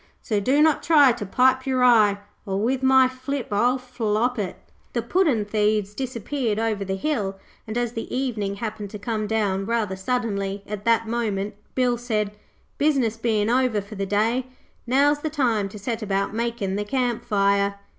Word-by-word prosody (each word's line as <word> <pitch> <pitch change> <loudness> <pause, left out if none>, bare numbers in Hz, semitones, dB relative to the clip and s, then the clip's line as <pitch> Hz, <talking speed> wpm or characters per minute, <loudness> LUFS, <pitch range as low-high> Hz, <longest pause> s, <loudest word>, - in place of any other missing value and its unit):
So 210 -2 0
do 270 +8 +3
not 315 -2 +3
try 290 -5 +6
to 210 -4 -5
pipe 260 +5 +3
your 260 -1 +2
eye, 215 -5 +5 0.3
Or 195 -2 -2
with 250 +5 0
my 265 0 +5
flip 260 +1 -5
I'll 240 +5 +2
flop 245 -1 -1
it.' 195 -3 -3 0.4
The 235 - -1
puddin' 270 - +2
thieves 210 -1 0
disappeared 245 -1 -2
over 220 -2 -1
the 190 0 -2
hill 195 -4 -2 0.3
and, 220 +2 -3
as 240 -1 0
the 225 - -6
evening 225 -7 -2
happened 210 -1 -5
to 210 - -7
come 215 0 -3
down 200 -3 0
rather 225 -4 0
suddenly 200 -2 -2
at 205 -1 -6
that 230 -1 +3
moment, 215 -3 -2 0.2
Bill 245 -2 +1
said, 215 -4 -1 0.5
'Business 270 -7 +2
bein' 220 -2 0
over 250 -4 +2
for 200 +2 -9
the 195 -1 -3
day, 225 +6 +1 0.4
now's 285 +4 +3
the 310 - -3
time 235 -9 0
to 210 - -10
set 225 +3 -4
about 200 -1 -1
makin' 225 -4 -2
the 205 - -1
camp 245 +1 -1
fire.' 200 0 +2
225 Hz, 175 wpm, -24 LUFS, 205-255 Hz, 0.5 s, try